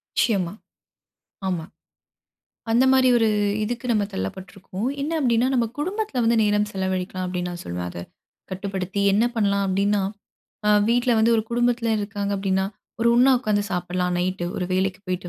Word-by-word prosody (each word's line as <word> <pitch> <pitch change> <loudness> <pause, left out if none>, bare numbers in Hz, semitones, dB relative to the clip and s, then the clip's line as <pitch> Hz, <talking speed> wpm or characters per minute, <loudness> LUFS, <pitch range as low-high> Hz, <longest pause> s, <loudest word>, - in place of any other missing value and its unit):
நிச்சியமா. 190 -7 +1 1.0
ஆமா. 175 -4 -2 1.1
அந்த 235 +3 +4
மாரி 260 -1 +5
ஒரு 225 -2 +3 0.4
இதுக்கு 240 +3 -4
நம்ம 210 -2 +2
தள்ளப்பட்ருக்கோம். 185 - -5
என்ன 300 +3 -2
அப்டீன்னா, 240 -3 +2
நம்ம 240 -2 +2
குடும்பத்தில 375 - -2
வந்து 230 +1 +3
நேரம் 210 0 +2
செலவழிக்கலாம் 185 -1 -2
அப்டீன்னு 180 -1 -3
நான் 175 0 -7
சொல்லுவேன் 90 0 -4
அத. - - -8 0.5
கட்டுப்படுத்தி 190 +1 -3
என்ன 210 +4 +3
பண்ணலாம் 200 -2 +2
அப்டீன்னா. 200 +1 +1 0.6
அ - - +5 0.2
வீட்ல 245 +1 +3
வந்து 225 +1 +4
ஒரு 220 - +1
குடும்பத்தில 240 -1 +1
இருக்காங்க 205 0 -3
அப்டீன்னா, 190 -1 0 0.4
ஒரு 235 - +4
ஒண்ணா 255 +3 +6
ஒக்காந்து 215 -4 0
சாப்படலாம் 180 0 -1
நைட் 185 0 -1
ஒரு 180 - -2
வேலைக்கு 185 0 0
போய்ட்டு 180 0 -3
200 Hz, 150 wpm, -23 LUFS, 185-235 Hz, 1.1 s, ஒண்ணா